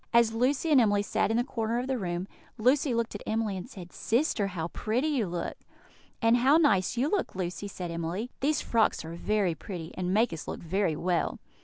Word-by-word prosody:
As 235 -1 +5
Lucy 265 +7 +1
and 275 -4 +7
Emily 205 -2 +3
sat 205 - 0
in 225 - +1
the 240 - +3
corner 230 -2 -2
of 245 - -1
the 265 -2 -1
room, 175 -1 -3 0.3
Lucy 260 +5 +3
looked 230 -1 -1
at 205 - -6
Emily, 220 -2 0
and 190 +6 -6
said: 180 -8 -10
"Sister, 230 -4 +1
how 170 -3 -4
pretty 245 - -1
you 255 -9 0
look!" 175 0 -4 0.7
"And 230 +1 +5
how 265 +5 +5
nice 225 - +3
you 255 +4 +2
look, 385 - -1
Lucy!" 185 +2 -3
said 180 -3 -6
Emily. 170 +8 -3
"These 295 +3 +1
frocks 225 -7 +1
are 165 - -6
very 195 0 0
pretty, 165 -1 -7
and 180 -1 -2
make 220 +1 +3
us 160 - -7
look - - -5
very 175 -1 0
well." 175 +2 0
215 Hz, 210 wpm, -29 LUFS, 180-245 Hz, 0.7 s, and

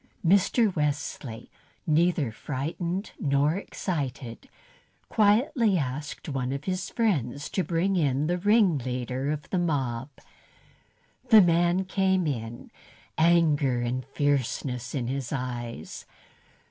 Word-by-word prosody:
Mr. 200 +3 +3
Wesley, 145 -6 -3 0.3
neither 160 -4 +2
frightened 170 - -4
nor 140 +1 +2
excited, 140 - -4 0.6
quietly 220 - +3
asked 145 +1 -4
one 135 -3 -2
of 140 +1 -4
his 185 +2 -3
friends 145 - -1
to 190 - 0
bring 180 +3 0
in 145 -4 +1
the 175 +3 0
ringleader 135 - +1
of 150 -2 -3
the 185 - +1
mob. 135 -7 -1 1.2
The 220 -3 +9
man 175 +2 +2
came 190 -1 +1
in, 120 -5 -4 0.4
anger 155 -6 +3
and 125 +2 -2
fierceness 135 -2 -1
in 130 -4 -1
his 130 0 -3
eyes. 120 - -5
150 Hz, 110 wpm, -27 LUFS, 130-180 Hz, 1.2 s, The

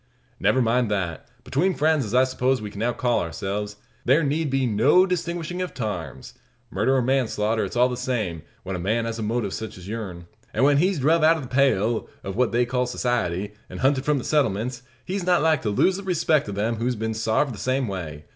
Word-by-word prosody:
"Never 130 -1 +3
mind 120 0 +2
that. 95 -6 -2 0.2
Between 180 +6 0
friends, 155 -3 +2
as 105 +3 -3
I 130 - +6
suppose 130 0 +1
we 105 -1 -6
can 100 - -9
now 120 +3 +1
call 120 -1 +1
ourselves, 100 +5 -4 0.3
there 140 +6 +4
need 150 +2 0
be 135 0 +1
no 120 - +4
nice 190 - +2
distinguishin' 170 +1 -4
of 180 - -4
tarms. 100 - -5 0.4
Murder 110 +8 +1
or 130 - +2
manslaughter, 115 -4 +1
it's - - -5
all 125 +1 +5
the 125 - -3
same, 115 -10 -2 0.2
when 95 0 -4
a - - -4
man 110 +6 0
has 115 0 -4
a - - -3
motive 110 -1 -1
sech 110 -2 -6
as 90 0 -11
yourn. 100 -6 -6 0.3
An' - - +2
when 140 0 +5
he's 185 +4 +2
druv 155 +4 +3
out 165 +1 +5
o' - - -5
the 130 - -7
pale 120 -4 +1
of 95 -1 -5
what 125 +1 +2
they 120 +1 +2
call 125 +1 -1
society, 105 -6 -1 0.2
an' - - -8
hunted 135 0 +2
from 150 -1 +2
the 130 - -3
settlements, 125 -4 0 0.2
he's 190 0 -3
not 175 -3 +3
like 160 -3 +3
to 110 - -1
lose 180 - +2
the 200 - -7
respect 165 - +1
of 100 - -5
them 110 +3 -1
who's 120 +2 -1
been 110 +1 -2
sarved 110 +5 0
the 105 - -9
same 130 +4 0
way. 80 -7 -6
120 Hz, 230 wpm, -24 LUFS, 105-140 Hz, 0.4 s, I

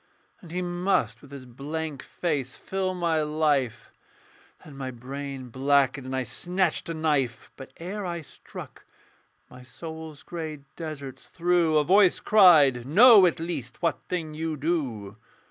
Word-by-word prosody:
And 170 - -13
he 180 +1 -2
must 175 - 0
with 140 - -15
his 140 -2 -10
blank 145 +4 -5
face 145 -7 -3
fill 190 -1 -3
my 170 -3 +1
life 145 -6 0 0.7
Then 145 - -12
my 135 -1 -5
brain 130 +1 -7
blackened; 135 +1 +1
and 130 - -3
I 130 - 0
snatched 180 +4 -1
a 165 - -3
knife. 145 -7 -1
But 135 - -11
ere 195 +5 -5
I 170 -2 -4
struck, 150 - -12 0.6
my 125 - -14
soul's 160 +3 -9
grey 160 -4 -6
deserts 150 -5 -8
through 175 -2 +2
A 150 - +4
voice 190 +3 +4
cried, 155 - +6
'Know 200 - +7
at 170 - -1
least 160 -6 -5
what 165 - 0
thing 165 -4 -3
you 160 0 -3
do.' 130 - -2
155 Hz, 145 wpm, -26 LUFS, 135-175 Hz, 0.7 s, Know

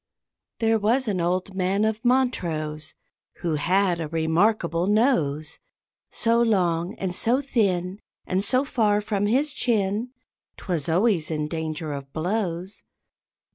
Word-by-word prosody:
There 225 -1 +2
was 235 +5 +1
an 190 -4 0
old 185 +3 -1
man 190 +2 +1
of 220 +1 -2
Montrose 170 - -1 0.5
Who 170 -2 -1
had 180 +3 +1
a 160 - -3
remarkable 170 +2 +1
nose, 165 - +1 0.5
So 230 0 +2
long 180 -4 +1
and 185 -2 -3
so 240 +7 +2
thin, 200 -8 0 0.3
And 185 +2 0
so 255 +6 +2
far 210 -6 +2
from 205 -1 -1
his 275 +6 +1
chin, 220 -3 0 0.5
'Twas 170 -5 -3
always 180 -2 +2
in 150 -2 -2
danger 160 -1 -4
of 140 -1 -7
blows. 180 +1 -2
190 Hz, 130 wpm, -24 LUFS, 165-225 Hz, 0.5 s, There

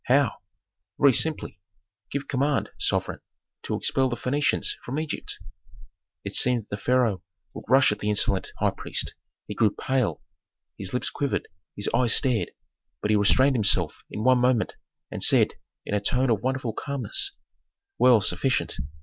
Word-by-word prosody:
"How?" 130 -2 +2 0.6
"Very 140 -2 +6
simply. 155 - +2 0.5
Give 140 0 -4
command, 140 +1 0
sovereign, - - -1 0.4
to - - -3
expel 130 -1 +1
the 120 - -2
Phœnicians 135 +5 0
from 135 +5 -4
Egypt." 155 -1 -4 0.9
It - - -5
seemed 125 -3 +3
that - - -31
the 100 - -3
pharaoh 115 -4 +1 0.3
would - - -9
rush 130 0 +5
at 105 - -4
the 105 - -2
insolent 100 -2 +1
high - - +1
priest; - - -1 0.3
he - - -6
grew 110 +1 +3
pale, 130 +2 -2 0.5
his 95 -2 -6
lips 125 - -2
quivered, 140 -1 -2 0.3
his 100 - -3
eyes 120 -1 +4
stared. 125 -6 +2 0.5
But 105 - +1
he - - +4
restrained 130 +7 +4
himself 95 -7 +2
in 105 - -5
one 130 0 +4
moment, 125 -2 +1 0.4
and - - -6
said, - - +4 0.3
in - - -5
a 105 - +2
tone 125 +4 +1
of 110 -2 0
wonderful 130 -3 -2
calmness, 385 - -2 0.7
"Well, 125 -4 +6
sufficient. 100 +8 -1
125 Hz, 160 wpm, -25 LUFS, 105-135 Hz, 0.9 s, Very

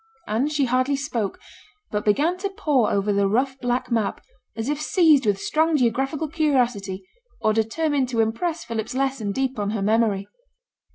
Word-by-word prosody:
And 245 +8 0
she 290 -2 +1
hardly 255 +3 +1
spoke, 245 -8 -3 0.5
but 210 0 -1
began 290 - +2
to 400 +1 -2
pore 290 - +1
over 200 +1 +1
the 200 0 +2
rough 260 +6 0
black 245 0 -1
map, 225 -4 0 0.4
as 225 +1 -4
if 295 +1 -1
seized 305 - +4
with 200 -1 +2
strong 315 +7 +1
geographical 270 +5 0
curiosity, 245 - 0 0.3
or 215 - +2
determined 260 +5 0
to 235 -3 -2
impress 310 +10 0
Philip's 225 +1 -4
lesson 265 -6 -1
deep 265 +1 -2
on 205 -1 -1
her 210 -2 -2
memory. 210 -2 +1
250 Hz, 165 wpm, -23 LUFS, 215-290 Hz, 0.5 s, seized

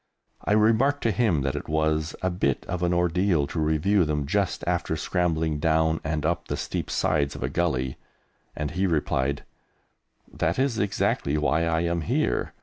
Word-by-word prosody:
I - - +1
remarked 115 +7 +3
to 115 - +2
him 105 - +1
that 70 +1 -1
it 75 - -5
was 80 +1 0
a 95 - +1
bit 80 -7 -1
of 90 0 -4
an 90 0 +1
ordeal 90 -2 +2
to 80 - -4
review 80 +6 +2
them 75 -2 -1
just 100 +6 -1
after 85 -2 0
scrambling 80 -2 0
down 80 +1 +2
and 75 -1 -2
up 85 +1 -1
the - - -2
steep - - -4
sides 75 -3 0
of - - -5
a 65 - -1
gully, 65 -6 -1 0.6
and 75 -1 -3
he 95 +1 0
replied, 70 -4 0 0.9
"That 85 +2 0
is 130 -4 +1
exactly 95 -7 0
why 75 +2 +1
I 80 0 +1
am 85 0 0
here. 75 - 0
80 Hz, 175 wpm, -25 LUFS, 75-90 Hz, 0.9 s, remarked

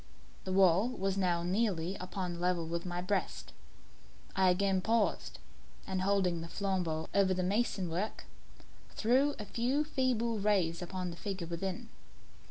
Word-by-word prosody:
The 190 - -3
wall 190 +3 +5
was 195 -6 -1
now 175 -3 +1
nearly 185 -2 0
upon 180 -1 -4
a - - -8
level 175 -1 +1
with 170 +2 -3
my 175 0 -3
breast. 195 +1 -2 0.8
I 190 -1 +4
again 190 +1 +2
paused, 225 +1 0 0.5
and 190 -1 -2
holding 185 -3 +1
the 165 - -6
flambeaux 175 -4 -1
over 190 -2 +3
the 185 - 0
mason 200 -1 0
work, 180 +6 -3 0.7
threw 265 +6 +3
a 210 - -6
few 250 +8 0
feeble 250 -6 0
rays 190 -5 +1
upon 180 0 -4
the 170 - -9
figure 195 -3 -4
within. 185 +7 -4
190 Hz, 150 wpm, -32 LUFS, 175-210 Hz, 0.8 s, wall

